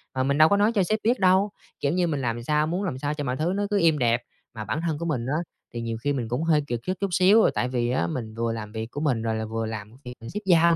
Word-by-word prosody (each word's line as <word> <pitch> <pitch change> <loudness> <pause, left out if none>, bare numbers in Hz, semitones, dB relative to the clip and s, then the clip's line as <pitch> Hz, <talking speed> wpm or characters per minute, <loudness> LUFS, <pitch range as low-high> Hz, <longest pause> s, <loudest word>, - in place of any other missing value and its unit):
mà 130 - +1
mình 140 +2 +1
đâu 155 +1 +7
có 200 - +4
nói 205 +2 +3
cho 200 - +4
sếp 215 +4 0
biết 240 +3 +2
đâu. 190 +2 +4 0.3
Kiểu 140 +1 0
như, 180 -1 +2
mình 145 -4 -1
làm 120 -1 -2
sao 150 +3 +1
muốn 180 +5 -2
làm 175 -10 -2
sao 145 +2 -2
cho 150 -1 -4
mọi 130 -2 -2
thứ 165 +5 0
nó 205 - 0
cứ 205 -1 +2
êm 165 -2 +4
đẹp, 120 -2 +2 0.3
mà 110 -2 -6
bản 110 +9 -2
thân 155 -3 -1
của 170 - -4
mình 135 -8 -1
á 135 +4 -1 0.4
thì 120 - -4
nhiều 115 -1 -3
khi 145 0 +1
mình 125 -4 -2
cũng 125 +7 -2
hơi 160 -2 +3
kiệt 120 -3 -2
sức 185 - -1
chút 200 - 0
xíu 190 +5 +5
là - - +3
tại 125 - +1
vì 120 -1 -1
á 85 -9 +1
mình 110 +4 -4
vừa 115 0 -1
làm 105 -2 -6
việc 110 +1 -5
của 145 - -5
mình 135 -7 +1
rồi 115 0 -1
là 110 0 -2
vừa 115 +1 -3
làm 110 -1 -6
việc 125 - -6
mà 115 - -8
sếp 210 - -3
giao 170 -2 +5
145 Hz, 325 wpm, -25 LUFS, 115-170 Hz, 0.4 s, đâu